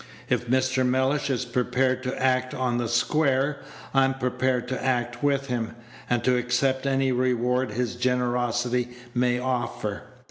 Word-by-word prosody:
If 120 Hz, -, 0 dB
Mr. 130 Hz, +1 st, +2 dB
Mellish 130 Hz, +3 st, +1 dB
is 130 Hz, -2 st, 0 dB
prepared 125 Hz, +1 st, 0 dB
to 130 Hz, 0 st, -4 dB
act 130 Hz, -1 st, +1 dB
on 125 Hz, -2 st, 0 dB
the 120 Hz, -, -1 dB
square, 140 Hz, +3 st, +1 dB, 0.3 s
I'm 135 Hz, -1 st, +3 dB
prepared 125 Hz, -1 st, 0 dB
to 130 Hz, -, -3 dB
act 120 Hz, -2 st, -1 dB
with 140 Hz, -1 st, +1 dB
him, 120 Hz, -4 st, -3 dB, 0.3 s
and 120 Hz, -1 st, +1 dB
to 125 Hz, -1 st, +3 dB
accept 130 Hz, +2 st, 0 dB
any 135 Hz, -1 st, +2 dB
reward 125 Hz, 0 st, +1 dB
his 120 Hz, +1 st, -2 dB
generosity 125 Hz, -1 st, 0 dB, 0.2 s
may 125 Hz, 0 st, +2 dB
offer. 120 Hz, -5 st, -2 dB
125 Hz, 145 wpm, -25 LUFS, 120-130 Hz, 0.3 s, I'm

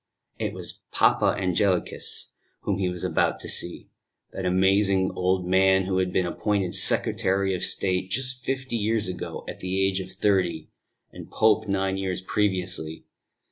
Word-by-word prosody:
It -, -, -2 dB
was -, -, -6 dB
Papa -, -, +3 dB
Angelicus 95 Hz, 0 st, 0 dB, 0.3 s
whom 100 Hz, -2 st, -1 dB
he 95 Hz, -2 st, +1 dB
was 90 Hz, -1 st, -5 dB
about 90 Hz, -4 st, +1 dB
to -, -, -6 dB
see; 85 Hz, -, -1 dB, 0.4 s
that 95 Hz, -1 st, -3 dB
amazing 95 Hz, +1 st, +3 dB
old 90 Hz, 0 st, 0 dB
man 95 Hz, +1 st, +4 dB
who 95 Hz, 0 st, 0 dB
had 90 Hz, -1 st, 0 dB
been 90 Hz, 0 st, +1 dB
appointed 95 Hz, 0 st, -1 dB
Secretary 95 Hz, 0 st, +1 dB
of 90 Hz, -, -3 dB
State 95 Hz, -1 st, 0 dB
just 125 Hz, +3 st, -2 dB
fifty 130 Hz, -2 st, -2 dB
years 110 Hz, -1 st, 0 dB
ago, 90 Hz, -1 st, -6 dB
at -, -, -7 dB
the 95 Hz, +1 st, -2 dB
age 95 Hz, 0 st, 0 dB
of 95 Hz, -, -6 dB
thirty, 95 Hz, -5 st, 0 dB, 0.4 s
and -, -, -11 dB
Pope 110 Hz, 0 st, +2 dB
nine 95 Hz, -1 st, 0 dB
years 95 Hz, -1 st, -2 dB
previously. 90 Hz, -5 st, -1 dB
95 Hz, 155 wpm, -25 LUFS, 90-100 Hz, 0.4 s, man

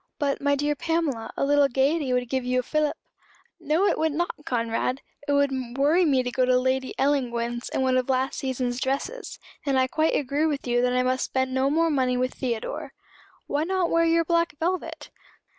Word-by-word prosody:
"But, 280 Hz, -2 st, -1 dB
my 285 Hz, 0 st, +2 dB
dear 290 Hz, +1 st, 0 dB
Pamela, 320 Hz, -6 st, -2 dB
a -, -, +1 dB
little 285 Hz, 0 st, +4 dB
gaiety 275 Hz, +2 st, +1 dB
would 250 Hz, 0 st, 0 dB
give 260 Hz, +1 st, -1 dB
you 255 Hz, 0 st, +1 dB
a -, -, -18 dB
fillip." 305 Hz, +3 st, 0 dB, 0.6 s
"No, 325 Hz, +4 st, +1 dB
it -, -, +1 dB
would 320 Hz, -1 st, +1 dB
not, 345 Hz, +3 st, 0 dB, 0.2 s
Conrad. 235 Hz, +2 st, -1 dB, 0.2 s
It 285 Hz, -, +1 dB
would 285 Hz, -1 st, +3 dB, 0.3 s
worry 310 Hz, +6 st, +4 dB
me 270 Hz, -4 st, +3 dB
to 250 Hz, -, -3 dB
go 255 Hz, -, +1 dB
to 250 Hz, 0 st, +4 dB
Lady 260 Hz, +1 st, 0 dB
Ellangowan's 240 Hz, -4 st, 0 dB
in -, -, -1 dB
one 260 Hz, -1 st, +2 dB
of 255 Hz, +1 st, -1 dB
last 260 Hz, +1 st, 0 dB
season's 255 Hz, -2 st, -2 dB
dresses; 355 Hz, -, -3 dB, 0.3 s
and 275 Hz, -3 st, +1 dB
I 260 Hz, -, +4 dB
quite 315 Hz, +5 st, +1 dB
agree 290 Hz, +3 st, 0 dB
with 290 Hz, -3 st, -2 dB
you 245 Hz, -1 st, +1 dB
that 250 Hz, 0 st, +1 dB
I 250 Hz, 0 st, +2 dB
must 255 Hz, 0 st, 0 dB
spend 260 Hz, 0 st, -1 dB
no 265 Hz, +1 st, +2 dB
more 325 Hz, +2 st, +2 dB
money 255 Hz, -3 st, +1 dB
with 255 Hz, +1 st, -1 dB
Theodore." 235 Hz, -4 st, -4 dB, 0.5 s
"Why 290 Hz, +2 st, -1 dB
not 365 Hz, 0 st, 0 dB
wear 335 Hz, 0 st, +3 dB
your 330 Hz, 0 st, +3 dB
black 335 Hz, -1 st, +1 dB
velvet?" 325 Hz, -2 st, -3 dB
275 Hz, 205 wpm, -25 LUFS, 255-310 Hz, 0.6 s, little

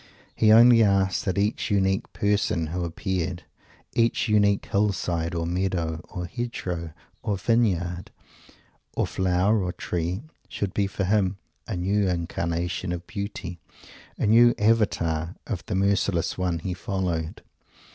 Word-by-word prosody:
He 110 Hz, -1 st, +4 dB
only 115 Hz, +1 st, +8 dB
asked 100 Hz, -3 st, +2 dB
that 95 Hz, -1 st, -1 dB
each 105 Hz, +2 st, 0 dB
unique 95 Hz, -1 st, +1 dB
person 100 Hz, -5 st, 0 dB
who 90 Hz, 0 st, -2 dB
appeared; 90 Hz, 0 st, -3 dB, 0.5 s
each 115 Hz, +1 st, +2 dB
unique 105 Hz, -2 st, +3 dB
hill 105 Hz, 0 st, +1 dB
side 85 Hz, -2 st, -2 dB
or 85 Hz, 0 st, -1 dB
meadow 85 Hz, -2 st, -1 dB
or 90 Hz, -2 st, -5 dB
hedgerow 90 Hz, -7 st, -4 dB, 0.3 s
or 100 Hz, -2 st, -1 dB
vineyard 90 Hz, -6 st, 0 dB, 0.9 s
or -, -, +1 dB
flower 95 Hz, +3 st, +1 dB
or 90 Hz, -, -1 dB
tree; 90 Hz, +3 st, -3 dB, 0.3 s
should 100 Hz, -3 st, -3 dB
be 100 Hz, -1 st, +1 dB
for 100 Hz, 0 st, -3 dB
him 95 Hz, -1 st, +1 dB, 0.3 s
a 110 Hz, -, -3 dB
new 100 Hz, +3 st, +1 dB
incarnation 85 Hz, +1 st, -2 dB
of 90 Hz, 0 st, -4 dB
Beauty, 100 Hz, -4 st, -6 dB, 0.6 s
a -, -, 0 dB
new 120 Hz, +3 st, +6 dB
avatar 90 Hz, -6 st, +1 dB
of 95 Hz, -6 st, -4 dB
the 105 Hz, -, -2 dB
merciless 100 Hz, -3 st, +1 dB
One 90 Hz, -2 st, -1 dB
he 90 Hz, +3 st, -4 dB
followed. 90 Hz, -4 st, -3 dB
95 Hz, 135 wpm, -25 LUFS, 85-105 Hz, 0.9 s, only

